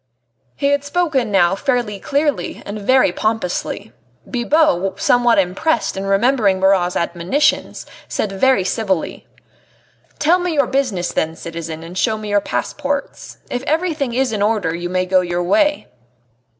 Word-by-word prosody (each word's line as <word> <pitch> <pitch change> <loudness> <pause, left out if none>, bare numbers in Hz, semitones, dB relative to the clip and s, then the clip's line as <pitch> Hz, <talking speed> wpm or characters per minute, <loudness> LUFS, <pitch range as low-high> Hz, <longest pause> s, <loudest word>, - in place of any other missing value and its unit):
He 280 - 0
had 285 0 +1
spoken 285 -6 0
now 190 -3 +3
fairly 235 -2 -1
clearly 285 +5 -1
and 205 +1 -6
very 255 -1 +4
pompously. 215 -1 -2 0.3
Bibot, 240 - +1
somewhat 240 -1 +3
impressed 195 - 0
and 195 0 -3
remembering 205 -2 +2
Marat's 190 -2 +2
admonitions, 175 - 0 0.2
said 210 - -2
very 195 +1 +2
civilly: 190 -3 -2 0.9
"Tell 335 +4 +3
me 355 -2 -2
your 280 -2 +3
business 240 -10 -1
then, 160 +1 -1
citizen, 165 -1 -7
and 170 +2 -10
show 220 +3 +1
me 215 -1 -7
your 205 0 +2
passports. 285 +5 -4
If 245 - -2
everything 310 -6 -1
is 260 -1 +1
in 210 - -2
order 205 -6 +1
you 175 +1 -4
may 185 0 0
go 185 0 +3
your 175 0 -2
way." 295 - +2
215 Hz, 145 wpm, -19 LUFS, 185-275 Hz, 0.9 s, very